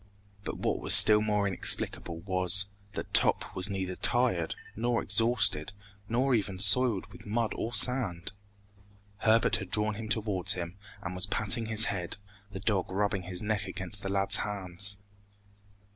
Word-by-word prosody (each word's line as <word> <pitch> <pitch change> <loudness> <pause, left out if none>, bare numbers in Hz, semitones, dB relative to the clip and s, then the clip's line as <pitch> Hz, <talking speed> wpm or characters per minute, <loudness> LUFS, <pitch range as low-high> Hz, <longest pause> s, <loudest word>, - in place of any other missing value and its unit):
But - - -7
what - - -3
was - - +8
still 105 0 +9
more 105 -1 -1
inexplicable 85 -3 0
was, 95 +2 +2 0.2
that - - -8
Top - - +1
was 95 +2 -1
neither 95 -2 -5
tired, 120 -10 -1 0.2
nor 120 +2 -2
exhausted, 105 -5 0 0.4
nor 130 +4 -1
even 100 -4 -2
soiled 100 +2 +3
with - - -15
mud 115 +1 -2
or 115 - -5
sand! 120 -10 0 0.9
Herbert 110 +2 +1
had 95 -4 -9
drawn 105 +1 0
him 110 +1 -9
towards 105 -5 -1
him, 85 0 -7 0.3
and 95 -1 -6
was 90 +2 0
patting 110 +3 0
his 110 0 +3
head, 90 -2 -5 0.3
the 95 - -8
dog 100 -4 -2
rubbing 100 0 -2
his 90 +2 -2
neck 105 -1 -3
against 95 +2 -5
the 95 - -6
lad's 100 0 +3
hands. 100 0 -2
100 Hz, 155 wpm, -28 LUFS, 95-110 Hz, 0.9 s, still